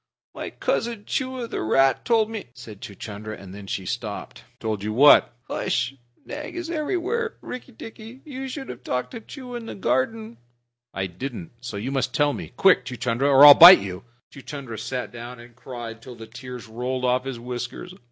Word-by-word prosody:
"My -, -, -5 dB
cousin 230 Hz, -3 st, -2 dB
Chua, 260 Hz, -2 st, -2 dB
the -, -, -4 dB
rat, 135 Hz, +5 st, +3 dB
told 225 Hz, -3 st, +3 dB
me 220 Hz, -3 st, -5 dB
" -, -, -40 dB
said 110 Hz, -4 st, -11 dB
Chuchundra, 105 Hz, +1 st, -7 dB
and 95 Hz, -1 st, -11 dB
then 100 Hz, -1 st, -10 dB
he 95 Hz, -1 st, -3 dB
stopped. 115 Hz, -3 st, -5 dB, 0.2 s
"Told 110 Hz, -2 st, -2 dB
you 105 Hz, +1 st, -2 dB
what?" 140 Hz, +6 st, +7 dB, 0.2 s
"H'sh! 120 Hz, +3 st, -1 dB, 0.3 s
Nag 295 Hz, +2 st, -7 dB
is 345 Hz, -1 st, -4 dB
everywhere, 375 Hz, +9 st, -1 dB
Rikki 255 Hz, +1 st, -8 dB
tikki. 225 Hz, +2 st, -11 dB
You 270 Hz, -3 st, -6 dB
should 270 Hz, +1 st, -6 dB
have 125 Hz, +1 st, -8 dB
talked 125 Hz, 0 st, -2 dB
to 230 Hz, -, -7 dB
Chua 250 Hz, +1 st, -8 dB
in 230 Hz, -, -10 dB
the -, -, -6 dB
garden." 215 Hz, -, -1 dB, 0.5 s
"I 95 Hz, -, -2 dB
didn't 95 Hz, +1 st, -6 dB
so 120 Hz, -5 st, -6 dB
you 120 Hz, +7 st, -3 dB
must 135 Hz, -1 st, -1 dB
tell 145 Hz, -1 st, +3 dB
me. -, -, -7 dB
Quick, 195 Hz, -1 st, +5 dB
Chuchundra, 125 Hz, +2 st, -1 dB
or 140 Hz, +1 st, +9 dB
I'll 145 Hz, -, +13 dB
bite 175 Hz, +5 st, +11 dB
you!" 95 Hz, -2 st, -6 dB, 0.3 s
Chuchundra 130 Hz, -4 st, -8 dB
sat 125 Hz, +2 st, -4 dB
down 120 Hz, +1 st, -9 dB
and 120 Hz, 0 st, -14 dB
cried 120 Hz, -2 st, -8 dB
till 125 Hz, +1 st, -10 dB
the 115 Hz, -1 st, -10 dB
tears 125 Hz, +1 st, -9 dB
rolled 125 Hz, +3 st, -3 dB
off 125 Hz, 0 st, +2 dB
his 130 Hz, -3 st, -5 dB
whiskers. 125 Hz, +8 st, -6 dB
130 Hz, 190 wpm, -24 LUFS, -, 0.5 s, I'll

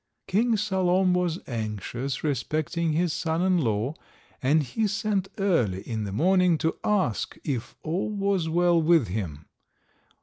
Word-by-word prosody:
King 225 Hz, +4 st, +2 dB
Salom 190 Hz, -2 st, +2 dB
was 180 Hz, -2 st, 0 dB
anxious 115 Hz, +3 st, -4 dB
respecting 155 Hz, +4 st, -1 dB
his 170 Hz, 0 st, +1 dB
son 165 Hz, +1 st, -1 dB
in 185 Hz, -1 st, +3 dB
law, 115 Hz, 0 st, 0 dB, 0.5 s
and 145 Hz, +4 st, +3 dB
he 210 Hz, -, -1 dB
sent 205 Hz, -2 st, -1 dB
early 125 Hz, -, +1 dB
in 110 Hz, -2 st, -2 dB
the 100 Hz, -, -4 dB
morning 180 Hz, -, +3 dB
to 160 Hz, +1 st, 0 dB
ask 190 Hz, -, 0 dB
if 125 Hz, -5 st, -3 dB
all 170 Hz, +6 st, -1 dB
was 200 Hz, -5 st, 0 dB
well 175 Hz, 0 st, +3 dB
with 160 Hz, -, +3 dB
him. 85 Hz, -7 st, -4 dB
165 Hz, 140 wpm, -26 LUFS, 125-185 Hz, 0.5 s, in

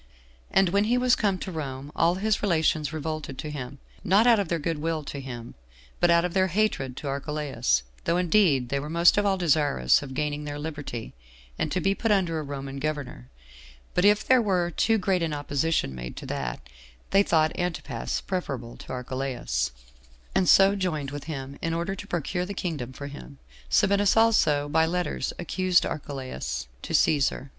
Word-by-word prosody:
And 190 Hz, -2 st, +3 dB
when 200 Hz, +3 st, +2 dB
he 240 Hz, +3 st, +2 dB
was 250 Hz, 0 st, +4 dB
come 200 Hz, -3 st, +1 dB
to 185 Hz, -, -6 dB
Rome, 140 Hz, -3 st, -5 dB
all 170 Hz, +2 st, +3 dB
his 215 Hz, +3 st, 0 dB
relations 160 Hz, -5 st, +1 dB
revolted 155 Hz, -3 st, -4 dB
to 150 Hz, -, -5 dB
him; 140 Hz, -1 st, -6 dB, 0.3 s
not 200 Hz, +5 st, +4 dB
out 235 Hz, -3 st, +6 dB
of 200 Hz, -, -1 dB
their 170 Hz, -, 0 dB
good 165 Hz, 0 st, -2 dB
will 160 Hz, 0 st, -2 dB
to 140 Hz, -, -6 dB
him, 120 Hz, -3 st, -7 dB, 0.5 s
but 175 Hz, -, +4 dB
out 170 Hz, 0 st, +4 dB
of 175 Hz, -, -3 dB
their 190 Hz, -1 st, +3 dB
hatred 170 Hz, -10 st, 0 dB
to 145 Hz, -, -5 dB
Archelaus; 140 Hz, -, -1 dB, 0.2 s
though 170 Hz, -, +2 dB
indeed 175 Hz, -, +3 dB
they 140 Hz, -, 0 dB
were 150 Hz, +2 st, -6 dB
most 170 Hz, +4 st, +5 dB
of 205 Hz, -, +1 dB
all 195 Hz, -1 st, +2 dB
desirous 145 Hz, -, +3 dB
of 135 Hz, -2 st, -8 dB
gaining 150 Hz, +1 st, -2 dB
their 145 Hz, 0 st, -5 dB
liberty, 145 Hz, -6 st, -6 dB, 0.5 s
and -, -, -1 dB
to 185 Hz, -, 0 dB
be 195 Hz, +2 st, +2 dB
put 225 Hz, +3 st, -2 dB
under 180 Hz, -6 st, +2 dB
a -, -, -2 dB
Roman 140 Hz, -1 st, -6 dB
governor; 140 Hz, -, -4 dB, 0.7 s
but 180 Hz, -, +2 dB
if 210 Hz, +1 st, +4 dB
there 255 Hz, -1 st, +5 dB
were 180 Hz, -5 st, +1 dB
too 225 Hz, +5 st, +2 dB
great 185 Hz, -2 st, +1 dB
an 165 Hz, -2 st, -1 dB
opposition 145 Hz, -, 0 dB
made 60 Hz, -1 st, -7 dB
to -, -, -7 dB
that, 60 Hz, -1 st, -4 dB, 0.4 s
they 195 Hz, -, +6 dB
thought 160 Hz, -5 st, +2 dB
Antipas 160 Hz, -9 st, -3 dB
preferable 135 Hz, -11 st, -4 dB
to -, -, -10 dB
Archelaus, 125 Hz, -, -2 dB, 0.6 s
and 185 Hz, -, +2 dB
so 195 Hz, +1 st, +7 dB
joined 155 Hz, -8 st, -2 dB
with 145 Hz, 0 st, -6 dB
him, 140 Hz, -3 st, -6 dB
in 165 Hz, 0 st, -1 dB
order 170 Hz, +3 st, -2 dB
to 200 Hz, +1 st, -8 dB
procure 175 Hz, +1 st, -2 dB
the 200 Hz, -, -5 dB
kingdom 150 Hz, -10 st, -3 dB
for 140 Hz, +2 st, -8 dB
him. 140 Hz, 0 st, -10 dB, 0.3 s
Sabinus 200 Hz, -, +3 dB
also, 155 Hz, -11 st, +4 dB
by 160 Hz, +2 st, +3 dB
letters, 180 Hz, +1 st, -1 dB
accused 180 Hz, +1 st, +2 dB
Archelaus 130 Hz, -, -4 dB, 0.2 s
to -, -, -6 dB
Cæsar. 140 Hz, -2 st, +2 dB
155 Hz, 185 wpm, -26 LUFS, 140-185 Hz, 0.7 s, so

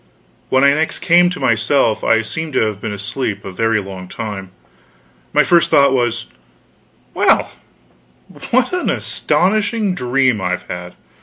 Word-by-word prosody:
When 130 Hz, +1 st, +3 dB
I 140 Hz, 0 st, +6 dB
next 160 Hz, +2 st, -1 dB
came 175 Hz, +1 st, +4 dB
to 180 Hz, -, -6 dB
myself, 115 Hz, 0 st, +1 dB
I 115 Hz, 0 st, +3 dB
seemed 160 Hz, +6 st, -5 dB
to -, -, +2 dB
have 105 Hz, -2 st, -4 dB
been 110 Hz, -, -4 dB
asleep 105 Hz, 0 st, -4 dB
a 95 Hz, -, -6 dB
very 115 Hz, +3 st, 0 dB
long 95 Hz, -2 st, -8 dB
time. 100 Hz, -2 st, -6 dB, 0.8 s
My -, -, +4 dB
first 170 Hz, -2 st, +3 dB
thought 140 Hz, -1 st, +4 dB
was, 120 Hz, -2 st, 0 dB, 0.9 s
"Well, -, -, +2 dB, 1.0 s
what 255 Hz, +7 st, +1 dB
an 360 Hz, -, -1 dB
astonishing 210 Hz, +1 st, 0 dB
dream 125 Hz, -, +1 dB
I've 90 Hz, -1 st, -2 dB
had! 90 Hz, 0 st, -7 dB
120 Hz, 145 wpm, -17 LUFS, 105-160 Hz, 1.0 s, I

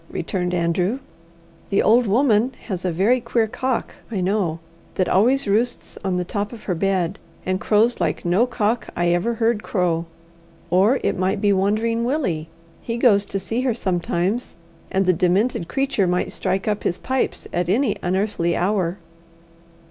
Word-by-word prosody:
returned 180 Hz, +1 st, -2 dB
Andrew. 180 Hz, +5 st, 0 dB, 0.7 s
"The 200 Hz, -, +2 dB
old 235 Hz, +2 st, +4 dB
woman 235 Hz, +2 st, +3 dB
has 185 Hz, -5 st, -4 dB
a 180 Hz, -, 0 dB
very 210 Hz, +9 st, +2 dB
queer 230 Hz, -1 st, +1 dB
cock, 255 Hz, +3 st, -2 dB, 0.2 s
I 215 Hz, -5 st, -2 dB
know, 185 Hz, -3 st, 0 dB, 0.4 s
that 185 Hz, -, +1 dB
always 250 Hz, +8 st, +3 dB
roosts 230 Hz, +5 st, 0 dB
on 190 Hz, -2 st, 0 dB
the 180 Hz, -, -1 dB
top 205 Hz, +3 st, -3 dB
of 230 Hz, -3 st, -10 dB
her 185 Hz, -, -1 dB
bed, 185 Hz, +1 st, 0 dB, 0.3 s
and 185 Hz, 0 st, -1 dB
crows 225 Hz, +3 st, +2 dB
like -, -, -1 dB
no 185 Hz, +8 st, +3 dB
cock 230 Hz, -1 st, -1 dB
I 175 Hz, 0 st, +1 dB
ever 175 Hz, +7 st, +1 dB
heard 225 Hz, -1 st, +1 dB
crow. 170 Hz, -5 st, 0 dB, 0.6 s
Or 200 Hz, +9 st, +4 dB
it -, -, 0 dB
might 190 Hz, +2 st, +1 dB
be 205 Hz, 0 st, +3 dB
Wandering 215 Hz, +4 st, +1 dB
Willie 235 Hz, -, -1 dB, 0.3 s
he 230 Hz, 0 st, -3 dB
goes 210 Hz, -5 st, +4 dB
to 195 Hz, -, -4 dB
see 225 Hz, +5 st, -2 dB
her 255 Hz, -3 st, 0 dB
sometimes, 185 Hz, +2 st, -1 dB, 0.3 s
and 190 Hz, 0 st, +1 dB
the 185 Hz, -, +4 dB
demented 180 Hz, +2 st, +1 dB
creature 265 Hz, -3 st, 0 dB
might 180 Hz, 0 st, 0 dB
strike 190 Hz, +2 st, -2 dB
up 210 Hz, -1 st, 0 dB
his 175 Hz, -, -1 dB
pipes 260 Hz, 0 st, -2 dB
at 175 Hz, 0 st, 0 dB
any 225 Hz, +2 st, +2 dB
unearthly 180 Hz, -2 st, 0 dB
hour." 185 Hz, -1 st, 0 dB
200 Hz, 165 wpm, -22 LUFS, 180-230 Hz, 0.7 s, old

